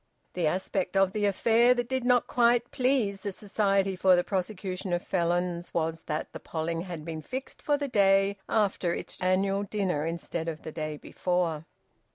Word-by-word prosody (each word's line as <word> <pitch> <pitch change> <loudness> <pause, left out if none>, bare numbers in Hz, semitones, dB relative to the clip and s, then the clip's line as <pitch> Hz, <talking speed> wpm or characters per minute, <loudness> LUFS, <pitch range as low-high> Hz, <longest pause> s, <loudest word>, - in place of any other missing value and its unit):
The 175 -3 0
aspect 190 +3 -1
of 195 0 +3
the 210 -1 0
affair 230 +5 +4
that 245 -1 -1
did 260 0 -1
not 245 -1 +3
quite 240 0 +2
please 250 -7 +1
the 200 - -3
Society 195 -1 0
for 185 0 +5
the 175 - +2
Prosecution 185 -1 -3
of 175 - 0
Felons 175 0 -1
was 165 0 -1
that 155 -1 -3
the - - -6
polling 165 +1 -3
had 170 -4 -7
been 160 -2 -5
fixed 260 - -6
for 290 -1 +1
the 285 0 -2
day 195 -3 +3
after 195 -5 +1
its - - -7
annual 195 +2 +2
dinner 190 -7 -1
instead 165 0 -4
of 160 -1 -5
the 155 - -6
day 155 -1 -4
before. 170 -2 -1
190 Hz, 180 wpm, -28 LUFS, 170-210 Hz, -, for